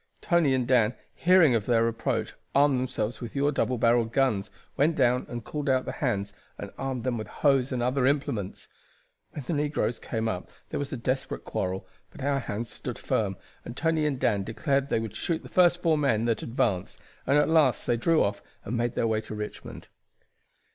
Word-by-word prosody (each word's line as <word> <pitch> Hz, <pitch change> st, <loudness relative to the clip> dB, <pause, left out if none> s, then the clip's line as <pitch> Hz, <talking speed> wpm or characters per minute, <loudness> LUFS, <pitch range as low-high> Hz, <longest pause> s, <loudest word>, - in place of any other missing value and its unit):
Tony 170 Hz, -7 st, +3 dB
and 125 Hz, -2 st, -1 dB
Dan, 125 Hz, -2 st, +3 dB, 0.2 s
hearing 175 Hz, -6 st, +5 dB
of 110 Hz, -3 st, 0 dB
their 115 Hz, -1 st, +3 dB
approach, 115 Hz, 0 st, -2 dB, 0.2 s
armed 140 Hz, -2 st, +4 dB
themselves 120 Hz, -3 st, -3 dB
with 120 Hz, +1 st, -7 dB
your 140 Hz, +1 st, +2 dB
double 130 Hz, -3 st, 0 dB
barreled 115 Hz, 0 st, +3 dB
guns, 115 Hz, -6 st, +1 dB, 0.3 s
went 150 Hz, +4 st, +2 dB
down 125 Hz, -3 st, +2 dB
and 120 Hz, -1 st, -5 dB
called 145 Hz, +2 st, -3 dB
out 130 Hz, -1 st, +2 dB
the -, -, -3 dB
hands 100 Hz, -7 st, -2 dB, 0.2 s
and 100 Hz, -, -7 dB
armed 130 Hz, -3 st, -3 dB
them 120 Hz, -2 st, -1 dB
with 110 Hz, -, -5 dB
hoes 135 Hz, -3 st, +2 dB
and 125 Hz, -2 st, -1 dB
other 125 Hz, +1 st, +2 dB
implements. 135 Hz, -9 st, -1 dB, 0.7 s
When 145 Hz, -, -6 dB
the 170 Hz, -, -2 dB
negroes 145 Hz, -5 st, -1 dB
came 110 Hz, 0 st, -3 dB
up 90 Hz, -4 st, -3 dB, 0.2 s
there -, -, -3 dB
was 140 Hz, -1 st, -4 dB
a 135 Hz, -, -3 dB
desperate 130 Hz, +3 st, -2 dB
quarrel, 95 Hz, +1 st, -3 dB, 0.2 s
but -, -, -10 dB
our 140 Hz, 0 st, +1 dB
hands 115 Hz, -1 st, -4 dB
stood -, -, -5 dB
firm, 95 Hz, -4 st, -1 dB, 0.3 s
and 120 Hz, -, -8 dB
Tony 160 Hz, -2 st, +1 dB
and 140 Hz, -3 st, -2 dB
Dan 105 Hz, -5 st, +2 dB
declared 135 Hz, +6 st, 0 dB
that -, -, -16 dB
they -, -, +1 dB
would 110 Hz, -2 st, -5 dB
shoot 165 Hz, +7 st, -2 dB
the -, -, -11 dB
first 175 Hz, -1 st, +4 dB
four 160 Hz, -3 st, +3 dB
men 115 Hz, -6 st, +2 dB
that 115 Hz, -1 st, 0 dB
advanced, 115 Hz, -6 st, -1 dB, 0.3 s
and 140 Hz, -, +4 dB
at 150 Hz, -, +4 dB
last 155 Hz, -5 st, +3 dB
they 120 Hz, -, +2 dB
drew 160 Hz, +7 st, +3 dB
off 100 Hz, 0 st, -2 dB, 0.2 s
and 115 Hz, -, -3 dB
made 120 Hz, 0 st, -1 dB
their -, -, +1 dB
way 110 Hz, -1 st, +1 dB
to 110 Hz, 0 st, -8 dB
Richmond. 105 Hz, 0 st, -7 dB
125 Hz, 205 wpm, -27 LUFS, 115-140 Hz, 0.7 s, hearing